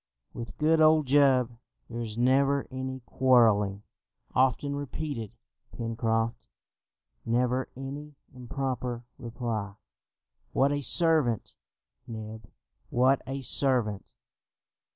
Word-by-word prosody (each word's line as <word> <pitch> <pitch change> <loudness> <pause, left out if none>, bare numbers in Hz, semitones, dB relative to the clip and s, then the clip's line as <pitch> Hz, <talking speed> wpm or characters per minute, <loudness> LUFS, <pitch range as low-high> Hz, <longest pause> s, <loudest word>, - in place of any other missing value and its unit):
"With 115 -2 -8
good 160 +1 +3
old 155 -1 +5
Jup 130 -3 +4 0.4
there 120 0 -6
is 110 -1 -6
never 135 +3 +3
any 130 0 -5
quarrelling," 110 -6 +3 0.5
often 135 +2 +1
repeated 140 -5 -5 0.5
Pencroft, 115 0 -1 0.8
"never 125 +2 0
any 140 +3 -7 0.2
improper 125 -1 -4 0.2
reply! 115 -4 -4 0.8
What 135 +2 +3
a 145 0 -1
servant, 155 - +2 0.5
Neb, 110 -1 -8 0.4
what 130 +2 +3
a 135 +1 -4
servant!" 120 -6 +2
125 Hz, 90 wpm, -28 LUFS, 115-140 Hz, 0.8 s, old